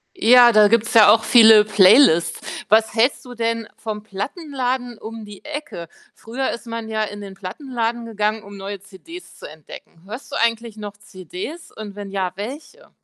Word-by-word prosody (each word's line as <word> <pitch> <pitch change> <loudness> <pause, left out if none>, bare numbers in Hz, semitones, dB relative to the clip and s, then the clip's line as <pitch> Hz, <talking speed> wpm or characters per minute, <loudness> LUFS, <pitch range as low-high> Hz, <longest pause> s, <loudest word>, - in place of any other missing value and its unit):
Ja, 245 -7 +6
da 215 -2 +5
gibt 230 0 +2
's - - -6
ja 215 -2 +8
auch 225 +1 +3
viele 220 -2 +7
Playlists. 195 - +4 0.3
Was 220 +1 +2
hältst 240 +4 +1
du 250 -1 -11
denn 230 -1 -2
vom 215 -1 -6
Plattenladen 250 - -5
um 225 0 -9
die 210 +4 -13
Ecke? 295 - -7 0.3
Früher 255 +4 -4
ist 235 - -7
man 230 -1 -7
ja 220 -1 -1
in 205 -1 -7
den 195 -1 -10
Plattenladen 235 +3 -5
gegangen, 215 -1 -2
um 200 0 -12
neue 195 +1 -7
CDs 215 - -14
zu - - -12
entdecken. 155 +2 -14
Hörst 235 +7 -10
du - - -5
eigentlich 230 -1 -1
noch 205 -1 -9
CDs 320 - -10
und 210 -2 -10
wenn 205 -1 -8
ja, 190 -2 -3
welche? 285 - -9
220 Hz, 180 wpm, -20 LUFS, 205-245 Hz, 0.3 s, ja